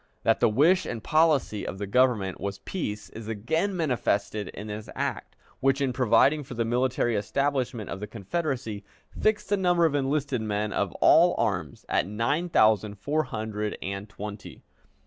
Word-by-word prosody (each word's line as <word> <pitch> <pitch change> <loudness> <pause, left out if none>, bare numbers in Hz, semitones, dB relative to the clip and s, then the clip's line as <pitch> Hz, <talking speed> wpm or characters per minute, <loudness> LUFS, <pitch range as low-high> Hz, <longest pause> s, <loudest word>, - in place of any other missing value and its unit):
That - - +3
the - - +4
wish 160 - +3
and 115 -3 -5
policy 155 -10 +2
of - - -5
the 100 - -3
Government 105 -4 +1
was 100 -1 -3
peace 105 - -5
is 110 -1 -9
again 160 - -1
manifested 110 - 0
in 105 - -8
this 105 0 -7
act, - - -3 0.2
which, 135 +1 +2
in 135 -3 0
providing 125 +5 +3
for 130 -2 -9
the 115 0 0
military 120 0 +1
establishment 125 +1 -1
of - - -5
the 105 - -5
Confederacy, 115 - -3 0.3
fixed 215 -3 0
the 205 - +2
number 175 -3 +3
of 160 - +2
enlisted 140 -2 0
men 105 -1 -2
of - - 0
all - - +6
arms - - -2
at - - +1
nine 115 - -1
thousand 110 - +3
four 145 +10 -1
hundred 105 -2 -4
and 100 +2 -5
twenty. 105 0 -8
115 Hz, 165 wpm, -27 LUFS, 105-145 Hz, 0.3 s, all